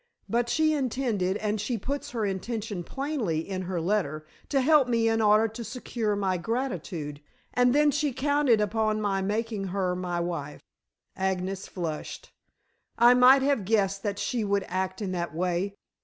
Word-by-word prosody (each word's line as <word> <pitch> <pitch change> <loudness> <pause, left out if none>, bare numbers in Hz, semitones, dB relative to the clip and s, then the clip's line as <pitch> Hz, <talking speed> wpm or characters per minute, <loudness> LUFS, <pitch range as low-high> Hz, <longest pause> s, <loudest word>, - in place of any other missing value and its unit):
But 235 +1 0
she 310 +4 +3
intended 235 -9 0
and 210 -1 -1
she 235 +3 -2
puts 280 +6 -4
her 230 -5 -2
intention 205 0 -3
plainly 240 - -2
in 190 -1 -3
her 180 -1 -3
letter 165 -4 -1 0.2
to 275 -2 +2
help 290 -1 +5
me 230 -2 +2
in 225 0 +2
order 215 +1 +5
to 225 +2 -7
secure 230 -3 -2
my 190 -2 0
gratitude, 175 - -3 0.3
and 245 0 +4
then 295 0 +5
she 295 0 0
counted 285 -3 +2
upon 215 +1 +1
my 200 -2 0
making 210 +1 -2
her 185 -1 -1
my 180 -1 -2
wife." 170 -4 -4 0.5
Agnes 190 0 -2
flushed. 165 -4 -5 0.7
"I 240 +1 +7
might 255 +2 +7
have 275 -6 +2
guessed 195 -1 +1
that 200 -1 -2
she 240 0 -1
would 200 -1 0
act 185 +2 -2
in 190 - -2
that 170 -4 -3
way. 180 +3 -1
210 Hz, 165 wpm, -27 LUFS, 185-245 Hz, 0.7 s, I